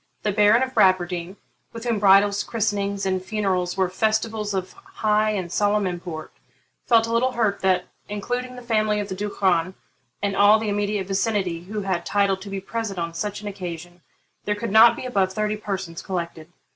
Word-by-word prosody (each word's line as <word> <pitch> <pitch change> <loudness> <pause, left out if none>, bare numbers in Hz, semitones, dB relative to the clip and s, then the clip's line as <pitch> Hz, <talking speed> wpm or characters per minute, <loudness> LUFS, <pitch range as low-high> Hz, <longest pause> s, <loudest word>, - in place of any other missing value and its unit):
The 210 - +1
Baron 210 +4 +4
of 260 0 -4
Bradwardine, 180 -1 +2 0.4
with 230 0 -7
whom 235 -3 0
bridals, 200 +1 +5
christenings, 200 -3 -1
and 185 -1 -1
funerals 190 -4 -1
were 190 -1 +2
festivals 215 +2 -1
of 185 -1 -3
high 215 0 0
and 185 -5 -3
solemn 205 +1 +1
import, 175 -3 -5 0.6
felt 230 -1 +5
a 230 - -3
little 250 +2 +2
hurt 215 -4 0
that, 185 -1 +2 0.2
including 245 +5 -3
the 250 - -10
family 215 -2 +1
of 205 0 -4
the 190 - -4
Duchran 185 -3 0 0.5
and 200 -1 0
all 205 +2 +6
the 220 -1 -3
immediate 205 -1 -1
vicinity 195 -3 -1
who 210 +2 -4
had 190 -3 -2
title 200 -1 +1
to 195 +1 -10
be 195 0 -3
present 210 0 -4
on 170 -1 -3
such 205 +5 -4
an 210 - -7
occasion, 175 -3 -7 0.4
there 210 - 0
could 210 0 -4
not 225 +2 +7
be - - -7
above 195 -6 0
thirty 215 +1 -1
persons 190 -5 -5
collected. 170 -3 -5
200 Hz, 185 wpm, -23 LUFS, 185-215 Hz, 0.6 s, not